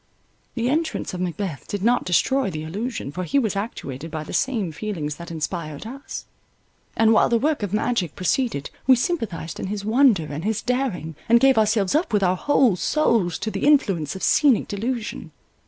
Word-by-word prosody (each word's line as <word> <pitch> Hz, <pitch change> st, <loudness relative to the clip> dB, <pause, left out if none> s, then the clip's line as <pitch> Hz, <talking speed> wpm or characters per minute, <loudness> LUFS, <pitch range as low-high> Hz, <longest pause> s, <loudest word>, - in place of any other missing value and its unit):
The 235 Hz, -1 st, 0 dB
entrance 315 Hz, -, -1 dB
of 180 Hz, -, -4 dB
Macbeth 180 Hz, -4 st, -4 dB
did 200 Hz, -2 st, -4 dB
not 240 Hz, +2 st, +2 dB
destroy 260 Hz, +8 st, +2 dB
the 155 Hz, -3 st, -5 dB
illusion, 200 Hz, -, -4 dB
for 185 Hz, +5 st, -4 dB
he 270 Hz, +10 st, 0 dB
was 220 Hz, -7 st, +1 dB
actuated 165 Hz, -, -5 dB
by 155 Hz, -1 st, -4 dB
the -, -, -9 dB
same 230 Hz, -10 st, 0 dB
feelings 155 Hz, -5 st, -4 dB
that 170 Hz, 0 st, -9 dB
inspired 160 Hz, 0 st, -4 dB
us, 270 Hz, +5 st, -7 dB, 0.7 s
and 225 Hz, 0 st, +5 dB
while -, -, +4 dB
the 235 Hz, -, +3 dB
work 295 Hz, +4 st, 0 dB
of 205 Hz, -3 st, -3 dB
magic 210 Hz, -6 st, 0 dB
proceeded 185 Hz, -, -1 dB, 0.2 s
we 260 Hz, -, +8 dB
sympathized 225 Hz, -, -3 dB
in -, -, -3 dB
his 200 Hz, 0 st, -4 dB
wonder 225 Hz, -, +4 dB
and 150 Hz, +2 st, -6 dB
his 215 Hz, +1 st, -1 dB
daring, 245 Hz, -, -2 dB
and 235 Hz, +1 st, +7 dB
gave 270 Hz, +1 st, +5 dB
ourselves 210 Hz, -3 st, +2 dB
up 305 Hz, -5 st, 0 dB
with 205 Hz, -1 st, +3 dB
our 180 Hz, 0 st, +3 dB
whole 260 Hz, -2 st, +3 dB
souls 220 Hz, -, +1 dB
to 220 Hz, -, -3 dB
the -, -, -1 dB
influence 195 Hz, -, +2 dB
of 190 Hz, -, -7 dB
scenic 280 Hz, -7 st, +4 dB
delusion. 230 Hz, +3 st, -4 dB
210 Hz, 190 wpm, -23 LUFS, 175-250 Hz, 0.7 s, we